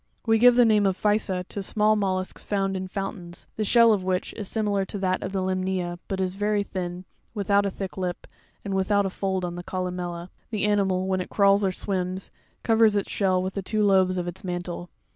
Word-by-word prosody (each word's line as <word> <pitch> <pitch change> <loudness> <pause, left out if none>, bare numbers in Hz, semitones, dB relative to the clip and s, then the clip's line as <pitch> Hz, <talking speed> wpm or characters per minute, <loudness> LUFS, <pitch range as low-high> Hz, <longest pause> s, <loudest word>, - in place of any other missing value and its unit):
24. 225 - -1
We 225 - +4
give 245 +1 +7
the 245 -1 +6
name 210 -3 +4
of 190 -1 0
Puysa 210 -3 +1
a - - -6
to 200 +2 -5
small 215 +2 +2
mollusks 190 -2 -2
found 195 -1 -1
in 190 0 -3
foun 195 +2 -4
it - - -11
tains, 175 - -13
the 215 - -1
shell 230 +1 +6
of 195 -3 -1
which 185 0 -1
(fig. - - -11
30) - - -4
is 200 - -5
similar 205 -2 0
to 190 - -5
that 185 -1 0
of - - -4
the 190 -1 -1
limnea, 185 -2 -2
but 195 - -3
very 205 +2 0
thin, 180 -2 -5 0.3
without 200 0 +2
a - - 0
thick 190 0 -6
lip, 180 -2 -3 0.4
and 200 - -3
without 200 +1 +2
a 190 - -2
fold 190 -1 -2
on 175 - -4
the 175 0 -6
columella. 180 -1 -4 0.2
The 215 -3 -1
animal, 195 -3 +1
when 190 -1 0
it - - -6
crawls 200 0 +4
or 190 - +2
swims, 185 -1 -3 0.3
covers 225 -2 +4
its 200 - -1
shell 185 -2 +1
with 185 0 -3
the 195 - -3
two 215 +3 0
lobes 190 -2 +3
of 175 -1 -2
its 175 +2 -7
mantle. 175 -1 -4
190 Hz, 240 wpm, -25 LUFS, 185-205 Hz, 0.4 s, give